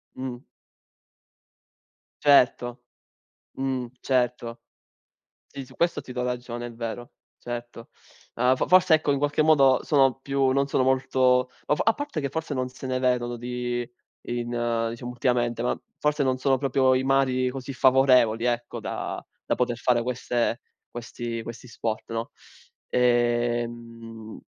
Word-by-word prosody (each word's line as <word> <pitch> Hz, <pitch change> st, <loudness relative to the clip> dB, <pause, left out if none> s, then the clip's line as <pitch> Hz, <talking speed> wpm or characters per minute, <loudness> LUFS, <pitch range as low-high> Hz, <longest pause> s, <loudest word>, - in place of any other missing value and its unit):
Mh. 130 Hz, -1 st, -5 dB, 1.9 s
Certo. 120 Hz, -3 st, +4 dB, 0.8 s
Mh, 130 Hz, -2 st, -1 dB
certo. 125 Hz, -2 st, -1 dB, 0.9 s
Sì, 135 Hz, -, -8 dB
su -, -, -17 dB
questo 170 Hz, +1 st, 0 dB
ti -, -, -11 dB
do 125 Hz, 0 st, -3 dB
ragione, 120 Hz, -1 st, -4 dB
è 120 Hz, -, -8 dB
vero. 115 Hz, +1 st, -6 dB, 0.3 s
Certo. 120 Hz, -1 st, -7 dB, 0.4 s
Ma 125 Hz, +2 st, +3 dB
f -, -, -1 dB
forse 180 Hz, -3 st, +6 dB
ecco 155 Hz, -2 st, 0 dB
in -, -, 0 dB
qualche 145 Hz, +2 st, +1 dB
modo 140 Hz, -4 st, +5 dB
sono 135 Hz, -3 st, +3 dB
più 135 Hz, -1 st, +1 dB
non 140 Hz, +1 st, +1 dB
sono 135 Hz, -, +1 dB
molto 130 Hz, -1 st, +2 dB, 0.2 s
o 150 Hz, -, +2 dB
f -, -, -2 dB
a 225 Hz, -, +5 dB
parte 290 Hz, -, -4 dB
che 140 Hz, -, -1 dB
forse 160 Hz, +2 st, -4 dB
non 130 Hz, -1 st, -1 dB
se 130 Hz, +1 st, -11 dB
ne 130 Hz, 0 st, -1 dB
vedono 120 Hz, -1 st, 0 dB
di 120 Hz, 0 st, -3 dB, 0.4 s
in 120 Hz, 0 st, -3 dB, 0.4 s
diciamo 120 Hz, +2 st, -6 dB
ultimamente, 120 Hz, -1 st, 0 dB
ma 125 Hz, -, -1 dB, 0.2 s
forse 150 Hz, -1 st, +1 dB
non 130 Hz, -1 st, +1 dB
sono 135 Hz, +1 st, +2 dB
proprio 130 Hz, -1 st, +2 dB
i 130 Hz, 0 st, +1 dB
mari 130 Hz, -1 st, +2 dB
così 135 Hz, +1 st, -6 dB
favorevoli, 130 Hz, -4 st, +4 dB
ecco, 120 Hz, -1 st, -2 dB
da -, -, -5 dB, 0.2 s
da -, -, 0 dB
poter 120 Hz, -1 st, -1 dB
fare 120 Hz, -1 st, +1 dB
queste 120 Hz, -1 st, -1 dB, 0.3 s
questi 120 Hz, 0 st, -5 dB
questi 115 Hz, +2 st, -9 dB
sport, 115 Hz, -1 st, -4 dB
no? 115 Hz, 0 st, -3 dB, 0.6 s
Ehm, 120 Hz, -2 st, -1 dB
125 Hz, 145 wpm, -25 LUFS, 120-135 Hz, 1.9 s, forse